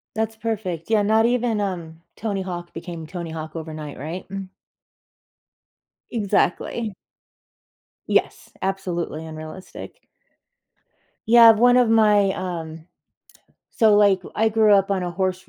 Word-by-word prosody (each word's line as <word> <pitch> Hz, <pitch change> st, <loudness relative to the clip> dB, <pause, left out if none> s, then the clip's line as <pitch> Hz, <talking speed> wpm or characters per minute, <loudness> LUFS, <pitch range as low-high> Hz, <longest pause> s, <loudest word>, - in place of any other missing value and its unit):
That's 220 Hz, 0 st, -2 dB
perfect, 210 Hz, -6 st, -4 dB
yeah, 220 Hz, -, +4 dB
not 220 Hz, +2 st, +3 dB
even, 240 Hz, -2 st, +1 dB
um, 170 Hz, -4 st, -5 dB
Tony 200 Hz, -4 st, -3 dB
Hawk 175 Hz, -2 st, -7 dB
became 170 Hz, -3 st, -7 dB
Tony 170 Hz, -1 st, -6 dB
Hawk 155 Hz, 0 st, -7 dB
overnight, 155 Hz, -2 st, -7 dB
right? 160 Hz, +7 st, -6 dB
Mm. 195 Hz, -1 st, -6 dB, 1.6 s
Exactly. 215 Hz, 0 st, -1 dB, 1.1 s
Yes, -, -, 0 dB
absolutely 180 Hz, -4 st, -3 dB
unrealistic. 160 Hz, -, -10 dB, 1.2 s
Yeah, 230 Hz, 0 st, +8 dB
one 245 Hz, +3 st, +4 dB
of 245 Hz, -2 st, +4 dB
my, 210 Hz, -3 st, +4 dB
um 165 Hz, -3 st, -6 dB, 0.9 s
so, 220 Hz, -3 st, +4 dB
like, 200 Hz, -3 st, +4 dB
I 220 Hz, +1 st, +2 dB
grew 215 Hz, -1 st, +4 dB
up 195 Hz, 0 st, +2 dB
on 190 Hz, -2 st, 0 dB
a 175 Hz, -, -3 dB
horse 185 Hz, +1 st, -3 dB
195 Hz, 120 wpm, -22 LUFS, 170-220 Hz, 1.6 s, Yeah